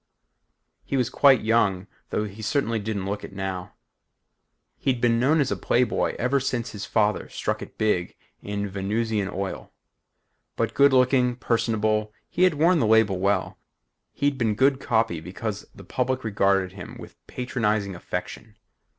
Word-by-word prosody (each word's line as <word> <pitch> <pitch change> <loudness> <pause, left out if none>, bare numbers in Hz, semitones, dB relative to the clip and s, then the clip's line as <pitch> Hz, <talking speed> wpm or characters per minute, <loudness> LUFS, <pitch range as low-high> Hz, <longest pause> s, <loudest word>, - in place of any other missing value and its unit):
He 135 - -2
was 125 -2 0
quite 135 -4 +5
young 105 -4 +2 0.2
though 105 - -1
he 105 +1 -7
certainly 115 -1 0
didn't 100 -2 -3
look 100 +1 -3
it - - -9
now. 95 -2 -5 1.0
He'd 130 -3 0
been 115 -1 +2
known 145 +6 +3
as 140 -2 +1
a - - +1
playboy 125 0 +1
ever 130 +3 +1
since 125 -2 -2
his 105 -1 -6
father 105 -2 +1
struck - - -3
it - - -10
big 105 -5 0 0.3
in 100 0 -3
Venusian 100 +1 -1
oil. 95 0 -5 0.8
But - - -1
good 140 0 +5
looking, 125 -1 +3
personable, 110 -3 0 0.2
he 180 - +2
had 180 -4 +2
worn 165 +3 +4
the 115 - +2
label 110 -4 +4
well. 100 0 0 0.5
He'd 140 -1 -1
been 110 -3 +1
good 135 +3 +3
copy 110 - 0
because 95 +5 -5
the - - -12
public 130 0 -1
regarded 100 -3 +1
him 95 -1 -9
with - - -11
patronizing 110 -5 -1
affection. 90 +5 -6
110 Hz, 155 wpm, -25 LUFS, 100-125 Hz, 1.0 s, quite